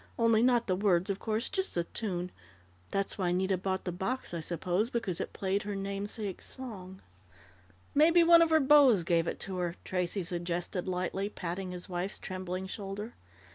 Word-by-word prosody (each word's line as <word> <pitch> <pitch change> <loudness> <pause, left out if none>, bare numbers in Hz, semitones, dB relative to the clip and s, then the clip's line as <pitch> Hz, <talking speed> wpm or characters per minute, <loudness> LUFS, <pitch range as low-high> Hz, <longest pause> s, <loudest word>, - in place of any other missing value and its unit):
"Only 230 -1 +4
not 245 -1 +4
the 185 - +1
words, 185 -1 +2
of 195 - -4
course, 220 +2 -1
just 380 0 -2
the 170 - +1
tune. 180 -1 -3 0.6
That's 195 +1 -2
why 180 -2 +1
Nita 190 +2 +1
bought 190 +1 -2
the 180 - -1
box, 190 +6 -3
I 170 - -2
suppose, 175 +6 -1
because 215 -8 -2
it - - -4
played 195 +1 -1
her 205 -1 -4
namesake 200 0 -4
song 190 -8 -8 0.4
" 90 0 -28 0.2
"Maybe 335 +4 +6
one 335 0 +8
of 330 - +4
her 315 0 +5
beaus 270 - +6
gave 165 0 +2
it - - -3
to 190 -1 -4
her," 175 -1 -2
Tracey 180 +1 -1
suggested 175 +1 -3
lightly, 185 +2 -1
patting 185 -1 -4
his 180 -1 -5
wife's 180 +2 -3
trembling 185 0 -5
shoulder. 200 +3 -6
190 Hz, 180 wpm, -31 LUFS, 180-220 Hz, 0.6 s, one